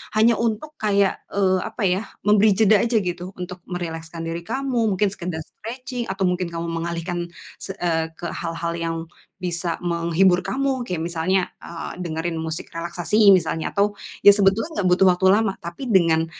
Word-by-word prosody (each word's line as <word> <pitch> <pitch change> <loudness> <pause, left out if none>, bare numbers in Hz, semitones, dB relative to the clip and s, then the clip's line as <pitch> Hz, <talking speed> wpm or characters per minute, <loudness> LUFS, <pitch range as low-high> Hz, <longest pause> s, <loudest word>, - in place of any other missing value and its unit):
Hanya 225 +2 +5
untuk 235 +7 -2
kayak, 200 -2 +2
eee, 190 -2 +2
apa, 225 - -5
ya, 185 +2 +1 0.3
memberi 210 +1 +6
jeda 215 -1 +6
aja 235 -1 +2
gitu, 180 0 -4
untuk 180 0 -6
merilekskan 165 -2 -5
diri 165 +1 -3
kamu, 265 +2 -1
mungkin 200 +2 +2
sekedar 175 -4 -4
stretching, 245 - -6
atau 195 0 -2
mungkin 180 0 -1
kamu 165 0 -3
mengalihkan 170 +1 -3 0.3
se - - -5
eee, 165 -2 0
ke 170 - -5
hal-hal 165 0 -3
yang 165 0 -2 0.4
bisa 175 -1 -2
menghibur 170 +2 +3
kamu. 270 -1 0
Kayak 175 -3 -2
misalnya, 175 +3 +1 0.2
eee, 170 -1 -7
dengerin 165 0 -3
musik 160 0 -4
relaksasi 170 +4 -1 0.2
misalnya, 160 -1 -2
atau, 205 +1 +1 0.3
ya, 205 - +12
sebetulnya 200 +9 +2
enggak 185 - +2
butuh 190 +1 +4
waktu 180 +1 0
lama, 215 -1 +2
tapi 175 +10 -6
dengan 165 -5 +4
180 Hz, 165 wpm, -23 LUFS, 170-205 Hz, 0.4 s, ya